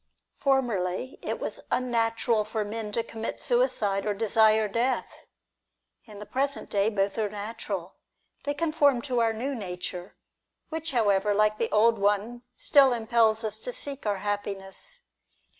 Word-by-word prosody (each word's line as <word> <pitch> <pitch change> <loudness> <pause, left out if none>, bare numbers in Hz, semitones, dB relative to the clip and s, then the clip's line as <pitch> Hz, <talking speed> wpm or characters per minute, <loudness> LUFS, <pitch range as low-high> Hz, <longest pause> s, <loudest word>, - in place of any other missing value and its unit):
Formerly, 245 -5 0
it - - -3
was - - -4
unnatural 230 -2 +1
for 215 0 -3
men 215 0 -4
to 230 - 0
commit 225 0 -5
suicide, 215 - +1
or 210 -1 -1
desire 220 0 +4
death. 235 +5 -2 0.8
In 215 -3 -12
the 210 - -8
present 280 +4 -2
day, 200 +1 +2
both 200 0 -1
are 215 -2 0
natural. 205 -3 -5 0.5
They 285 +1 -2
conform 290 -5 +2
to 255 -4 0
our 225 -1 +3
new 245 +6 -3
nature, 180 -4 -6 0.5
which 320 0 -3
however, 205 -4 +2
like 215 +1 +2
the 230 - 0
old 225 +1 +4
one, 205 +4 0
still 275 -3 +5
impels 225 -1 +2
us 215 0 -3
to - - -4
seek 285 - -6
our 205 -1 +1
happiness. 205 - -3
220 Hz, 145 wpm, -27 LUFS, 205-255 Hz, 0.8 s, still